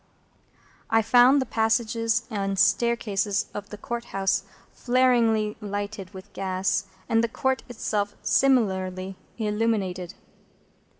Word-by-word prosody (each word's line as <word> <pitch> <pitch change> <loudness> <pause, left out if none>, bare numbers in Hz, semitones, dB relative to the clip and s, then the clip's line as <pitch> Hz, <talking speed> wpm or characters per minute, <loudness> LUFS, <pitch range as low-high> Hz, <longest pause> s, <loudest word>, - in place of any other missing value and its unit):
I 225 0 +3
found 245 +5 +6
the 260 - 0
passages 230 0 +1
and 195 -2 -2
staircases 205 -1 +1
of 205 0 -6
the 210 - -8
Court 235 +3 -5
House 195 0 0 0.3
flaringly 235 -4 +2
lighted 205 -1 -5
with 195 +1 -12
gas, 190 0 -1 0.2
and 225 0 +2
the - - +2
Court 265 +3 0
itself 210 -3 -2
similarly 190 -7 +1 0.2
illuminated. 210 -5 -1
215 Hz, 110 wpm, -25 LUFS, 195-235 Hz, 0.3 s, found